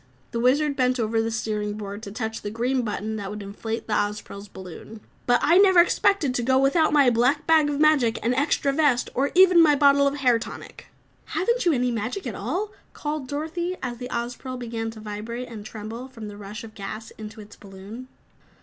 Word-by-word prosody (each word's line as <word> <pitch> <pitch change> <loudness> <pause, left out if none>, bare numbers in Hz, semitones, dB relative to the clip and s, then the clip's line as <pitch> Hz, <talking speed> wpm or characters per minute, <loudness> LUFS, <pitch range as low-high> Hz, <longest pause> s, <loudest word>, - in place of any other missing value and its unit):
The 235 - -2
Wizard 280 +4 +2
bent 255 -1 +1
over 225 0 +1
the 225 - -1
steering 215 -2 -2
board 205 0 -7
to 200 - -8
touch 220 0 -4
the 205 - -4
green 245 +4 0
button 220 -1 -3
that 200 -2 -5
would 210 0 -6
inflate 220 +3 -5
the 220 - -3
Ozpril's 205 -1 -3
balloon. 190 +3 -11 0.3
"But 245 0 +4
I 340 +5 +5
never 380 -3 +6
expected 345 -4 +3
to 250 - -1
go 260 +2 +2
without 275 +4 +3
my 285 -4 +5
black 250 +6 +2
bag 315 -2 +4
of 290 -1 -2
magic, 300 -7 +4
an 240 - +2
extra 275 +1 +1
vest, 280 -5 +2
or 275 +3 +1
even 365 -2 +7
my 300 -3 +6
bottle 280 0 +5
of 280 - -1
hair 250 -4 +3
tonic." - - -9 0.4
"Haven't 470 +3 0
you 340 - +4
any 250 -2 +1
magic 235 - -3
at 240 - -3
all?" 350 - -3 0.2
called 295 -2 -4
Dorothy, 330 +6 -3
as 240 -2 -4
the 250 0 -6
Ozpril 245 +2 -4
began 230 -2 -4
to 225 -1 -10
vibrate 220 +4 -6
and 220 -3 -9
tremble 220 +4 -7
from 225 -5 -9
the 205 - -9
rush 210 +3 -8
of 220 -1 -11
gas 215 +2 -7
into 215 +1 -8
its 210 0 -12
balloon. 200 +5 -11
245 Hz, 205 wpm, -24 LUFS, 215-285 Hz, 0.4 s, even